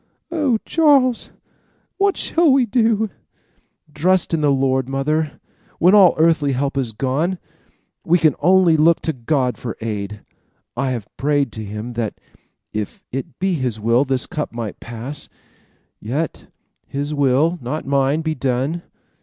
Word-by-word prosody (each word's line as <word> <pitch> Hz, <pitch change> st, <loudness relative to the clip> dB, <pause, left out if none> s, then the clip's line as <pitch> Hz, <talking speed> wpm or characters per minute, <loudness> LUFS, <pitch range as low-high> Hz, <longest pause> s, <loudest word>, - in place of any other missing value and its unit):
"Oh, 295 Hz, -8 st, +1 dB
Charles, 280 Hz, -7 st, +3 dB, 0.7 s
what 400 Hz, -1 st, +2 dB
shall 330 Hz, -3 st, +2 dB
we 265 Hz, -2 st, +4 dB
do?" 220 Hz, -2 st, +1 dB, 0.8 s
"Trust 175 Hz, +3 st, +2 dB
in 160 Hz, -, +1 dB
the 150 Hz, -, +3 dB
Lord, 130 Hz, -1 st, +1 dB
mother. 150 Hz, +3 st, 0 dB, 0.4 s
When 180 Hz, +3 st, +4 dB
all 195 Hz, -4 st, +7 dB
earthly 155 Hz, -3 st, +3 dB
help 135 Hz, +2 st, -1 dB
is 130 Hz, -4 st, -1 dB
gone, 140 Hz, -, -1 dB, 0.7 s
we 175 Hz, -, +4 dB
can 155 Hz, -4 st, +3 dB
only 180 Hz, 0 st, +4 dB
look 165 Hz, +2 st, +4 dB
to 160 Hz, -, -1 dB
God 130 Hz, 0 st, -1 dB
for 115 Hz, -, -5 dB
aid. 105 Hz, -2 st, -4 dB, 0.5 s
I 130 Hz, +2 st, -1 dB
have 120 Hz, -5 st, -4 dB
prayed 145 Hz, -3 st, +1 dB
to 110 Hz, -, -6 dB
him 105 Hz, +3 st, -6 dB
that, 115 Hz, -3 st, -3 dB, 0.6 s
if 105 Hz, -1 st, -4 dB
it 135 Hz, +1 st, -5 dB
be 190 Hz, 0 st, 0 dB
his 125 Hz, -8 st, -2 dB
will, 115 Hz, +4 st, +3 dB
this 130 Hz, -2 st, 0 dB
cup 150 Hz, -, -4 dB
might 115 Hz, -3 st, -6 dB
pass; 120 Hz, +5 st, -7 dB, 0.7 s
yet 140 Hz, +9 st, -4 dB, 0.4 s
his 145 Hz, +2 st, -3 dB
will, 145 Hz, +5 st, +2 dB
not 135 Hz, +6 st, -4 dB
mine, 140 Hz, +2 st, +1 dB
be 160 Hz, 0 st, -1 dB
done. 135 Hz, +4 st, -1 dB
145 Hz, 145 wpm, -20 LUFS, 125-170 Hz, 0.8 s, all